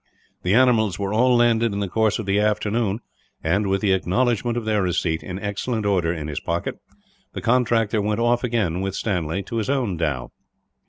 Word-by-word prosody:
The 90 +3 +1
animals 115 -6 +3
were 100 0 -2
all 125 +3 +4
landed 115 -2 +3
in 100 - -2
the 100 - -1
course 110 +2 +1
of 110 - -5
the 100 +1 +1
afternoon 105 +1 0 0.4
and, 100 +6 +1
with 95 0 0
the 100 - +2
acknowledgment 120 +5 0
of 120 - -3
their 105 -2 +1
receipt, 85 -3 0
in 90 +4 -6
excellent 105 +3 -3
order, 90 -5 +2
in 80 -3 -4
his 75 -2 -3
pocket, 85 +1 -3 0.5
the - - -4
contractor 115 -3 +2
went 105 +1 -1
off 120 +1 +2
again, 105 -8 0
with 95 0 -3
Stanley, 90 -3 -2
to 115 - -5
his 110 +2 -2
own 125 -10 0
dhow. 75 -7 -2
105 Hz, 195 wpm, -23 LUFS, 95-115 Hz, 0.5 s, all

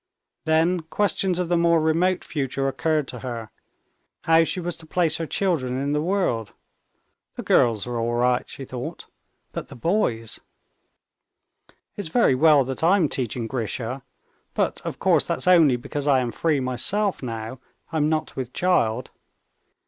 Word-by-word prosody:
Then 160 +3 +3
questions 185 +2 0
of 180 -1 -1
the 175 0 +2
more 170 -1 +4
remote 170 +4 +1
future 135 -2 -2
occurred 150 +2 0
to - - -6
her: 115 -4 -6 0.7
how 165 0 +5
she 180 - -2
was 175 -1 -3
to 160 - -15
place 165 -2 +1
her 165 - -4
children 145 -11 0
in 140 +2 -1
the 150 0 +1
world. 160 - -1 0.8
"The - - -6
girls 110 -4 +3
are 120 -1 -3
all 120 +1 -1
right," 125 +1 +1
she 135 - -8
thought; 125 -1 -6 0.5
"but - - -6
the - - -11
boys?" 120 - -1 1.6
"It's 200 -4 -5
very 230 - +4
well 150 +1 +5
that 135 +4 -5
I'm 175 -2 +4
teaching 120 -2 -2
Grisha, 120 +2 -3 0.5
but - - 0
of - - -5
course - - +3
that's 130 - -2
only 165 -8 +6
because 145 +4 -4
I 140 -2 +5
am 125 -2 -2
free 155 0 +1
myself 160 +10 -1
now, 115 0 -5 0.3
I'm 155 -2 +1
not 155 -1 -2
with 130 -2 -5
child. 125 -10 +1
145 Hz, 155 wpm, -24 LUFS, 125-170 Hz, 1.6 s, only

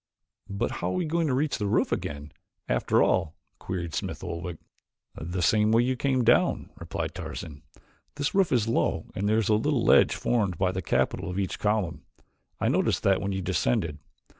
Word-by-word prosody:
"But 100 +4 -2
how - - -3
are - - -2
we 180 -2 0
going 165 +1 0
to 135 - +1
reach 145 +2 0
the 105 - -1
roof 105 - +1
again, 75 -5 -4 0.4
after - - +2
all?" 85 -4 +1 0.2
queried 85 -3 -4
Smith 95 +3 -4
Oldwick. 85 -1 -5 0.6
"The 85 +3 -4
same 105 +5 +3
way 115 +1 +4
you 130 +1 0
came 130 0 +1
down," - - +2
replied - - -4
Tarzan. 75 -3 -7 0.5
"This 145 +6 -1
roof 195 -3 +3
is 120 -4 +2
low 115 - 0
and 100 +2 -1
there 110 - +3
is 110 -2 +1
a - - +5
little 120 +3 +1
ledge - - +5
formed 100 -8 0
by 95 0 +1
the 95 0 -3
capital 85 - 0
of 90 - -4
each 95 -2 -2
column; 100 -8 0 0.6
I - - +1
noticed - - +1
that 95 -1 +3
when 100 - -2
you 95 -1 -3
descended. 75 +1 0
100 Hz, 190 wpm, -27 LUFS, 85-120 Hz, 0.6 s, a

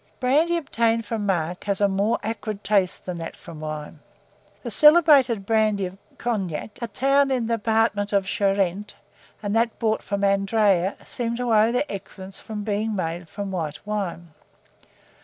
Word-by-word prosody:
Brandy 305 +7 +2
obtained 230 -7 0
from 210 -1 -3
marc 175 -2 -1
has 200 -2 -1
a 205 - +4
more 200 +4 +1
acrid 215 -1 -4
taste 195 -4 +1
than 180 -2 -4
that 165 - -7
from 165 -2 -11
wine. 155 0 -6 0.6
The - - -5
celebrated 295 - +6
brandy 215 -2 +2
of 185 +2 -8 0.2
Cognac, 205 -4 -3
a 235 - -2
town 275 +6 +2
in 255 -3 0
the 230 0 0
department 220 -2 +1
of 200 -2 +2
Charente, 195 -1 0 0.5
and 205 +1 -1
that 230 0 +1
brought 220 -2 0
from 200 0 -3
Andraye, 195 -1 +2
seem 235 -1 -3
to 240 -1 -1
owe 220 +1 +5
their 250 +4 +1
excellence 190 -1 -8
from 210 -2 -6
being 215 +1 -1
made 170 -2 -3
from 200 -1 -5
white 160 -3 -4
wine. 195 -5 -4
205 Hz, 160 wpm, -24 LUFS, 190-230 Hz, 0.6 s, celebrated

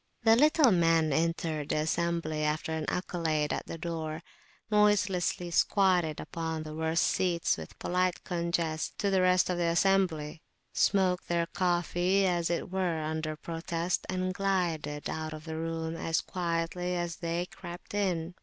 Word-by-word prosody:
The 225 -1 +6
little 300 0 +5
men 165 -4 +3
entered 160 -1 -1
the - - +1
assembly, 160 0 -1
after 150 +1 -1
an 160 -1 -2
accolade 160 -4 -1
at - - -4
the - - -5
door, 160 -1 -4 0.5
noiselessly, 195 -4 +2
squatted 180 -4 +2
upon 160 -1 -4
the 155 0 -7
worst 160 +1 +1
seats 175 -3 +1
with - - -10
polite 180 0 0
conges 170 -3 -1
to 200 - 0
the 190 -1 +3
rest 185 0 +3
of 175 - -2
the 175 - +1
assembly; 170 -4 +1 0.3
smoked, 185 -2 +2
took - - -26
their 170 -1 +1
coffee, 180 +2 +1
as 175 -2 +1
it 175 +1 -2
were, 180 -4 0
under 155 0 -2
protest, 165 +2 -3
and 185 0 -1
glided 175 -7 -1
out 155 0 -4
of 155 0 -9
the 160 -1 -5
room 165 0 -3
as 160 -2 0
quietly 175 +1 -2
as 175 -1 -3
they 170 +1 -2
crept 175 +1 -10
in. 180 -4 -1
170 Hz, 155 wpm, -30 LUFS, 160-180 Hz, 0.5 s, The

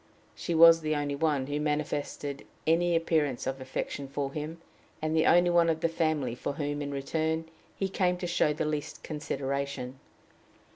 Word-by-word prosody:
She 170 - -3
was 165 0 +8
the 155 -1 0
only 145 -1 -1
one 145 -2 +1
who 145 +2 -2
manifested 150 -1 -2 0.2
any 170 +2 +3
appearance 155 -6 +1
of 130 0 -3
affection 135 +1 -4
for 140 0 -3
him, 155 +2 -5 0.4
and 155 0 -1
the 160 - +4
only 175 0 +5
one 170 -1 +4
of 160 -1 0
the 165 - +3
family 155 -6 0
for 125 - -3
whom, 145 0 -3
in 145 0 -3
return, 160 +3 -1 0.3
he 195 - -1
came 180 -2 +1
to 180 - -4
show 170 -3 +2
the 155 +1 -1
least 150 -1 -3
consideration. 140 -3 -3
150 Hz, 175 wpm, -29 LUFS, 140-165 Hz, 0.4 s, was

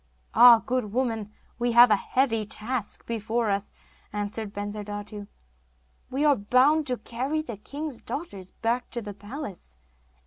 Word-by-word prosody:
'Ah, 235 -1 +8
good 250 -5 -1
woman, 225 -3 -1 0.3
we 240 0 +1
have 240 0 +8
a - - +7
heavy 225 +1 +1
task 215 +1 -4
before 225 0 -1
us,' 200 +1 -2 0.4
answered 210 +1 -4
Bensurdatu, 205 0 -6 0.8
'we 275 +4 0
are 290 -2 +6
bound 260 +8 +3
to 250 -1 0
carry 265 +8 -2
the 235 -8 -7
king's 285 +4 -6
daughters 200 - -6
back 235 +2 -2
to 235 - -4
the 205 -1 -6
palace! 205 - -8
230 Hz, 140 wpm, -26 LUFS, 205-255 Hz, 0.8 s, Ah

